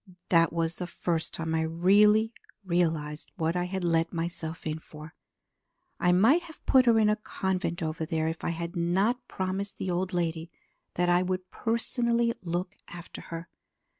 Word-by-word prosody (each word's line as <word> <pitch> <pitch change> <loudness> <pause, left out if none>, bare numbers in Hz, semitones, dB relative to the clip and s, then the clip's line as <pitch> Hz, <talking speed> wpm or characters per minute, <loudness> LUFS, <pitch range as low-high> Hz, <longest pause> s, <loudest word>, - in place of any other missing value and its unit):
That 165 -2 +5
was 165 0 -1
the 180 - -4
first 170 -2 -2
time 160 -1 -3
I 160 - +2
really 205 +7 +4 0.3
realized 160 -4 -1
what 165 +1 0
I 180 0 0
had 190 0 -3
let 165 -1 +2
myself 165 -1 -4
in 155 0 -2
for. 155 +1 -12 0.9
I 180 - +3
might 225 - +5
have 335 -2 -14
put 260 -2 +5
her 230 -1 +6
in 215 -1 +4
a 210 0 +3
convent 190 -4 -2
over 160 0 -2
there 160 -1 -1
if 160 0 -4
I - - 0
had 170 +1 -4
not 195 +9 +1
promised 190 +2 -3
the 185 - -2
old 180 +2 -1
lady 165 -2 -2 0.5
that 175 0 +1
I 175 0 +4
would 185 0 -3
personally 235 0 0
look 180 +1 -3
after 175 0 -9
her. 165 +1 -6
175 Hz, 170 wpm, -28 LUFS, 165-195 Hz, 0.9 s, her